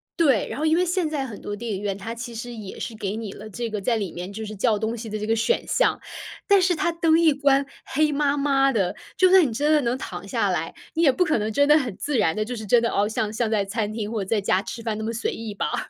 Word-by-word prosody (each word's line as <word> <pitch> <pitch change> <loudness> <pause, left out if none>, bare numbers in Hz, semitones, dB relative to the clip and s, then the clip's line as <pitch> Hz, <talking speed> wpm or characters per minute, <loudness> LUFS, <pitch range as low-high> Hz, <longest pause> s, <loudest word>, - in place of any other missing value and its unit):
对， 275 -10 +3
然 - - -5
后 310 - 0
因 315 +1 +3
为 360 - +3
现 355 -2 0
在 290 -3 -2
很 225 -6 -8
多 205 - -4
电 230 +2 -5
影 195 - -4
院， 200 -2 -2
它 220 +3 -5
其 235 0 -7
实 240 +2 -6
也 210 -4 -8
是 230 - -5
给 205 -1 -3
你 220 -3 -5
了 215 - -10
这 235 +2 -4
个， 210 -2 -3
在 235 +4 +1
里 200 -5 -3
面 180 +3 -6
就 220 +2 -6
是 215 0 -7
“叫 215 +2 +2
东 220 +2 -2
西” 225 -1 -7
的 215 - -3
这 210 - -3
个 225 +1 +1
选 350 - +1
项， - - +2 0.5
但 400 -2 +5
是 360 -1 +2
它 340 - 0
灯 330 -1 +3
一 325 -3 +5
关 280 -1 +3 0.2
黑 305 +2 +1
麻 285 0 +1
麻 275 -1 +3
的， 200 -7 0 0.2
就 370 - +5
算 380 -3 +7
你 255 - -1
真 290 +7 0
的 300 - +4
能 240 +1 0
躺 - - -7
下 - - 0
来， - - -2 0.2
你 330 - 0
也 285 - +6
不 360 +7 +1
可 315 - +2
能 215 +1 -2
真 285 +6 +3
的 300 +1 +7
很 250 -10 -2
自 290 -3 -1
然 165 -6 +2
地， 215 - -1
就 245 +2 -5
是 220 -2 -6
真 235 +3 +5
的， 230 - +2
哦， 205 +1 +1
像 215 -1 -2
像 225 0 0
在 210 -3 +1
餐 210 +1 -2
厅 215 -1 -4
或 220 -3 -2
在 210 +3 0
家 195 -1 +1
吃 230 +3 -7
饭 220 -2 -2
那 220 - -4
么 220 - -2
随 230 0 -2
意 220 -2 -6
吧？ - - -2
230 Hz, 320 characters per minute, -24 LUFS, 215-285 Hz, 0.5 s, 算